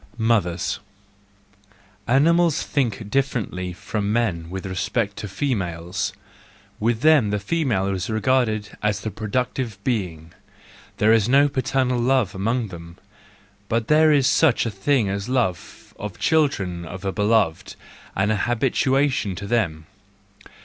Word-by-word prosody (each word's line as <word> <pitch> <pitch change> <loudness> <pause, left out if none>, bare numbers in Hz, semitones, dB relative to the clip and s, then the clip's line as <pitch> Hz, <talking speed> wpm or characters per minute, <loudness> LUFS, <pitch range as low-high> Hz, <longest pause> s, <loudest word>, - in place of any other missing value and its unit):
Mothers 110 -7 0 1.3
.—Animals 165 +5 +3
think 115 -7 -2
differently 110 -9 -1
from 100 +3 -3
men 100 -8 -1
with 95 +1 -6
respect 100 +3 -2
to 105 - -5
females; 95 - -2 0.7
with 115 +1 0
them 155 -8 +5
the 105 - 0
female 110 - 0
is 95 0 -3
regarded 110 -2 0
as 105 -1 0
the 110 - -4
productive 115 +2 -2
being. 90 -10 -3 0.6
There 110 +2 +4
is 115 0 +3
no 140 +2 +5
paternal 130 -2 0
love 125 -5 +2
among 110 +4 -1
them, 85 -1 -10 0.7
but 115 0 -1
there 155 +1 +5
is 140 -3 +4
such 140 -2 +3
a 115 - -2
thing 110 +3 +1
as 100 +3 -3
love 115 -9 -2
of 105 -2 -5
the - - -20
children 100 - +1
of 90 +4 -8
a 95 - 0
beloved, 105 -6 +1 0.4
and 100 +2 +1
habituation 130 +1 +1
to 100 +2 -6
them. 90 -9 -1
110 Hz, 130 wpm, -23 LUFS, 95-130 Hz, 1.3 s, them